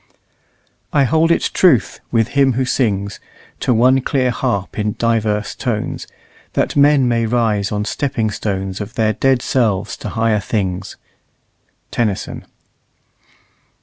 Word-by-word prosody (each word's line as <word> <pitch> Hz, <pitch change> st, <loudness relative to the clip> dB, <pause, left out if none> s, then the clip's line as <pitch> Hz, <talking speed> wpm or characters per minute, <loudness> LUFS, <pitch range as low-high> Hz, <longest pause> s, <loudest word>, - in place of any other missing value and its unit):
"I 145 Hz, -, +3 dB
[hold] 160 Hz, +4 st, +2 dB
it 170 Hz, -, +1 dB
truth, 170 Hz, -, +3 dB
with 115 Hz, -1 st, +2 dB
him 135 Hz, -2 st, +3 dB
who 130 Hz, +2 st, 0 dB
sings, 100 Hz, -6 st, -1 dB, 0.4 s
To -, -, 0 dB
one 130 Hz, +3 st, +4 dB
clear 130 Hz, -1 st, +1 dB
harp 100 Hz, -3 st, -2 dB
in 105 Hz, 0 st, 0 dB
divers 110 Hz, -3 st, 0 dB
tones, 115 Hz, -5 st, -3 dB, 0.5 s
That -, -, 0 dB
men 145 Hz, -2 st, +5 dB
may 115 Hz, -1 st, +1 dB
rise 110 Hz, -4 st, 0 dB
on 105 Hz, 0 st, -1 dB
stepping 115 Hz, -2 st, -1 dB
stones 95 Hz, -1 st, -3 dB
Of 105 Hz, +2 st, -7 dB
their 110 Hz, -1 st, +2 dB
dead 135 Hz, 0 st, +1 dB
selves 110 Hz, -7 st, 0 dB
to -, -, -6 dB
higher 115 Hz, -2 st, +1 dB
things." 95 Hz, -3 st, -3 dB, 1.0 s
TENNYSON. 110 Hz, -5 st, -2 dB
115 Hz, 130 wpm, -18 LUFS, 105-130 Hz, 1.0 s, men